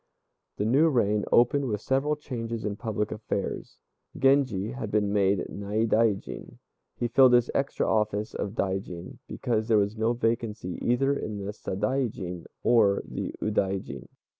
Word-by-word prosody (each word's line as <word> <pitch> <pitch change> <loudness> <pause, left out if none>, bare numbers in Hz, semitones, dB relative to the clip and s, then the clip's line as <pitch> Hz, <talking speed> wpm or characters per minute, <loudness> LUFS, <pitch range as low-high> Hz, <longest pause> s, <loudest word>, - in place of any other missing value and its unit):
The 105 - -1
new 140 +9 +4
reign 105 -6 +1
opened 130 +4 +4
with 105 -3 -1
several 135 +6 0
changes 115 -6 -5
in 105 -1 -2
public 105 -1 -3
affairs. 110 0 -4 0.4
Genji 130 -7 +2
had 120 -4 -5
been 105 -1 +1
made 100 -2 +2
Naidaijin. 105 - -1 0.4
He 120 - -1
filled 125 +1 +6
this 120 0 +4
extra 140 - 0
office 105 0 0
of 100 +1 -4
Daijin 95 -3 -3
because 110 -2 -1
there 110 -2 +4
was 100 +1 +1
no 110 +2 +1
vacancy 115 -6 -2
either 135 +4 +2
in 110 -6 -4
the 100 - -3
Sadaijin 105 -4 -3 0.2
or 105 -5 +4
the - - -5
Udaijin. 100 -2 -2
110 Hz, 140 wpm, -27 LUFS, 100-120 Hz, 0.4 s, filled